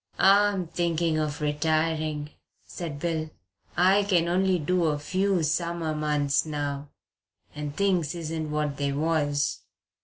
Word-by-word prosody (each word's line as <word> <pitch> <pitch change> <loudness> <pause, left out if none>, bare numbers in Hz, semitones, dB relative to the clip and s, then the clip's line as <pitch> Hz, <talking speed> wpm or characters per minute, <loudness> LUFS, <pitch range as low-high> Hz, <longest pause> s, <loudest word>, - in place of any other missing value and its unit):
"I'm 200 -1 +4
thinking 165 -1 0
of 150 0 -2
retiring," 155 0 0 0.3
said 165 -5 -6
Bill. 160 0 -2 0.5
"I 190 +3 +5
can 180 -4 +2
only 185 +1 +2
do 175 +2 +1
a 150 -2 +1
few 185 +4 0
summer 165 0 -1
months 150 -2 +1
now 145 -2 -4 0.6
and 150 -1 -5
things 180 -5 +1
isn't 160 -2 -4
what 150 -1 -1
they 140 -1 -1
was." 145 - 0
160 Hz, 125 wpm, -27 LUFS, 150-175 Hz, 0.6 s, I